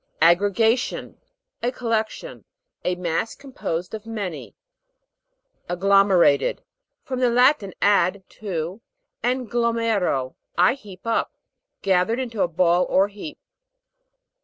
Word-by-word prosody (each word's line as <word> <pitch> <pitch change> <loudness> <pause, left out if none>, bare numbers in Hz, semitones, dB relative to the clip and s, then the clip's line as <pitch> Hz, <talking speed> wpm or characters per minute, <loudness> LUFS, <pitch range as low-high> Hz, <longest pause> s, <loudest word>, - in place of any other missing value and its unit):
AGGREGATION, 205 +8 +2 0.4
A 245 - 0
collection: 230 - -3 0.4
a 180 - 0
mass 180 +4 -2
composed 180 - -5
of 220 0 -7
many. 205 -7 -5 1.1
AGGLOM'ERATKD. 190 -4 +3 0.4
From 255 -1 -4
the 250 -1 +3
Latin, 245 -5 +3
ad, 200 -1 +3
to, 185 0 -5 0.4
and 255 -1 -1
glomero, 225 - 0 0.2
I 180 +7 +5
heap 205 -8 -13
up. 230 0 -1 0.5
Gathered 195 +5 +2
into 230 -5 -3
a - - +3
ball 175 +1 +2
or 195 +2 +3
heap. 210 +9 -9
205 Hz, 105 wpm, -23 LUFS, 180-230 Hz, 1.1 s, I